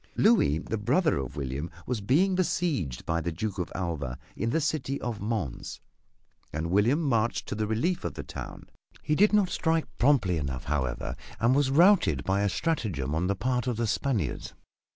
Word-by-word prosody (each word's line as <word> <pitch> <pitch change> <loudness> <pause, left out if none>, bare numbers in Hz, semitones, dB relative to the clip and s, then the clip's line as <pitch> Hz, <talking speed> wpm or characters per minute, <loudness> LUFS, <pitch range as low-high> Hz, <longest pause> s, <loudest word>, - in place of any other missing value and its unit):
Louis, 205 - +4
the 110 +6 -4
brother 140 - +2
of 65 -2 -5
William, 70 +4 -3 0.2
was 120 -4 -2
being 160 - +3
besieged 160 - -1
by 85 0 0
the 85 - -2
Duke 100 +4 -4
of 90 - -3
Alva 80 -9 -3 0.2
in 115 - -1
the 160 - +1
city 145 -3 -1
of 115 -5 -4
Mons, 105 - -3 0.7
and 80 +3 -3
William 110 - +3
marched 120 -5 0
to - - -2
the 105 0 -1
relief 120 - 0
of 85 -5 -4
the - - -5
town. - - -8 0.4
He 150 - 0
did 205 +7 +5
not 205 -3 +3
strike 165 -2 +1
promptly 120 - +3
enough, 65 -4 -3
however, 65 -4 -2 0.2
and 115 +4 +3
was 140 0 +3
routed 145 - +4
by 95 +1 +1
a 100 - +2
strategem 95 - -1
on 85 +3 0
the 100 - +1
part 125 +3 -1
of 120 -3 -1
the 115 - 0
Spaniards. 110 - -1
110 Hz, 185 wpm, -28 LUFS, -, 0.7 s, did